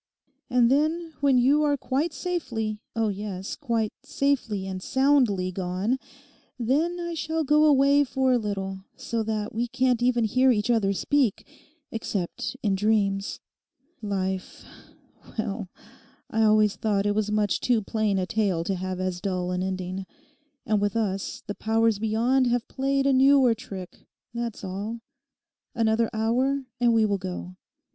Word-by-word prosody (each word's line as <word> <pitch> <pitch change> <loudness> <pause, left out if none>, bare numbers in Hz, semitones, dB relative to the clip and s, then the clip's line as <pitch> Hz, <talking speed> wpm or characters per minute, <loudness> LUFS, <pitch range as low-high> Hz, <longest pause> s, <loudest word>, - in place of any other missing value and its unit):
And 245 -1 +4
then, 320 +4 +1
when 275 -2 +4
you 275 +5 +4
are 290 -1 +2
quite 275 +5 -1
safely, 240 -10 -3 0.2
oh 225 -1 +1
yes, 195 -1 -5
quite 230 -6 -1
safely 240 -8 -1
and 190 -1 -5
soundly 250 -8 +2
gone, 190 +7 -1 0.6
then 300 +9 0
I 345 0 -3
shall 320 0 -1
go 300 +1 +4
away 285 0 +5
for 265 -1 +1
a 245 - +3
little, 195 -3 -4
so 230 -1 -3
that 215 -1 -3
we 235 +2 -1
can't 250 0 +1
even 240 -1 +2
hear 255 +4 +3
each 215 0 +1
other 215 -4 +2
speak, 260 +1 +1 0.5
except 210 0 -3
in 205 -3 +2
dreams. 200 -1 0 0.6
Life!—well, 195 +1 -5 0.6
I 225 - +1
always 215 -1 +4
thought 205 -2 0
it 205 - +2
was 210 0 -1
much 210 -1 +1
too 235 -4 +1
plain 215 -1 0
a 185 - 0
tale 195 -5 0
to 195 - -1
have 185 0 -4
as 185 -1 -2
dull 180 -2 -2
an 180 0 -1
ending. 185 0 -4 0.6
And 215 -2 +1
with 205 0 0
us 195 -4 -2
the 205 - -4
powers 225 0 +1
beyond 235 +4 +2
have 240 -1 0
played 275 +1 0
a 275 - +4
newer 265 -2 +5
trick, 200 -6 -9 0.3
that's 235 -2 -4
all. 205 +5 -5 0.7
Another 225 0 +2
hour, 255 +5 0
and 240 -1 +4
we 225 -1 +4
will 200 -2 0
go. 185 -1 -6
220 Hz, 150 wpm, -26 LUFS, 195-260 Hz, 0.7 s, away